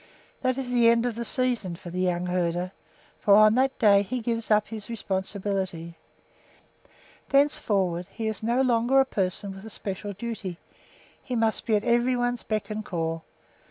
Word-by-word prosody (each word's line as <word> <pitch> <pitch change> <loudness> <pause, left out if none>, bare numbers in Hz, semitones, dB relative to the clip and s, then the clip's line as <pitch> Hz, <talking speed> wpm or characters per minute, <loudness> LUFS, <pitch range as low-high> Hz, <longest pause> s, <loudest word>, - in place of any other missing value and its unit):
That 255 -1 0
is 260 -2 -4
the 240 -2 +5
end 235 0 +3
of 245 - 0
the 235 +2 -4
season 240 -7 -1
for 175 +1 -10
the 180 +1 -2
young 180 -1 0
herder, 180 0 -1 0.5
for 200 - +5
on 215 0 +7
that 265 +2 +1
day 200 -4 +5
he 250 +6 -3
gives 230 -1 -2
up 210 -1 +3
his 215 -1 -7
responsibility. 190 -5 -3 1.3
Thenceforward 195 - +2
he 225 +3 -6
is 220 -1 -2
no 240 +4 +1
longer 245 +1 +3
a 270 - +5
person 195 -3 -2
with 195 0 -11
a 220 - -8
special 200 0 -5
duty; 205 -4 -5 0.7
he 250 - -4
must 225 -1 +1
be 220 - +3
at 205 - +1
every 240 +1 +2
one's 245 -1 -1
beck 215 0 -3
and 215 0 -3
call. 165 -3 -3
215 Hz, 175 wpm, -26 LUFS, 190-240 Hz, 1.3 s, on